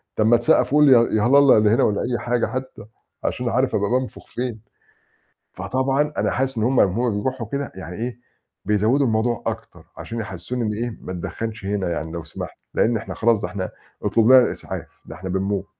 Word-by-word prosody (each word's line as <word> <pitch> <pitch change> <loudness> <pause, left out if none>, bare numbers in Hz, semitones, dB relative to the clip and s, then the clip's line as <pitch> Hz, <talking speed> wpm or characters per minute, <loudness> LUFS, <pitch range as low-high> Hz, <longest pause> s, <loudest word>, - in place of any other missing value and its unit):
طَب 110 - +2
ما 120 +1 +6
تسقّفوا 140 +5 +3
لي 145 - +6
يا 125 - +8 0.2
يا - - +1
هَلالة 140 +1 +6
يا - - +5
اللي 105 -1 +4
هنا 110 - +3
والّا 100 - +1
أي 120 -1 -1
حاجة 120 0 0
حتّى، 130 -3 -6 0.4
عشان - - -2
أبقى - - -1
عارف - - +1
أبقى 100 0 0
بانفُخ 130 0 -2
فين. 120 -3 -4 0.9
فطبعًا 135 +3 0
أنا - - +1
حاسس 135 0 -1
إن - - 0
هم 130 +2 +3
هم 100 +4 +2
أمّا 105 -4 0
يروحوا 130 0 -3
كده 140 -1 -3
يعني 90 -2 -8
إيه، 120 +2 -5 0.4
بيزوّدوا 110 +7 +2
الموضوع 115 0 0
أكتر - - -5
عشان 115 0 -5
يحسِّسوني 105 +4 -5
إن 105 - -1
إيه، 115 +1 -4
ما - - -7
تدخّنش 110 +4 -5
هنا 100 -3 -1
يعني 80 -1 -4
لو 85 -1 -5
سمحت 80 - -8 0.2
لإن 115 +1 +2
إحنا 110 +1 -5
خلاص 115 -2 +2
ده 95 - -3
إحنا 95 0 -4 0.3
أُطلب 115 -1 +2
لنا 130 - +10
الإسعاف - - -4 0.2
ده - - -9
إحنا 95 0 -6
بنموت. 95 +1 -1
115 Hz, 210 wpm, -22 LUFS, 100-125 Hz, 0.9 s, لنا